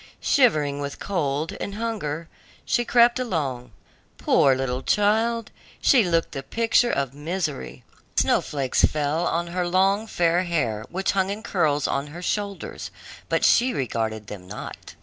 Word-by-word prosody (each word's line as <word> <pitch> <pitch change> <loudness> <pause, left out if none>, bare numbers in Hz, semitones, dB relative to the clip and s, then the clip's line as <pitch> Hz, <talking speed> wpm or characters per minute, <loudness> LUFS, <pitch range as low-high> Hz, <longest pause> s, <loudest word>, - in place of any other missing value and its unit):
Shivering 150 - +2
with 140 0 -5
cold 155 -5 -2
and 200 - -4
hunger, 195 -9 -3 0.4
she 240 - +1
crept 240 +1 +4
along; 140 - -2 0.5
poor 135 -1 +4
little 130 -1 -2
child, 225 +5 +1 0.3
she 250 -5 +5
looked 170 -3 0
the 135 - -5
picture 230 - +2
of 135 - -1
misery. 150 - -4 0.3
The - - +4
snowflakes 135 -3 0
fell 150 +3 +1
on 170 +1 0
her 180 -1 0
long, 195 +4 +2
fair 175 -3 +2
hair, 120 - -1
which 190 +3 -1
hung 190 -1 +1
in 205 +2 -4
curls 150 - +1
on 140 +1 -1
her 170 +5 -9
shoulders, 200 0 -3 0.4
but - - +2
she 250 +1 +4
regarded 110 -4 -2
them 100 -3 -9
not. 105 - -9
170 Hz, 150 wpm, -24 LUFS, 140-205 Hz, 0.5 s, she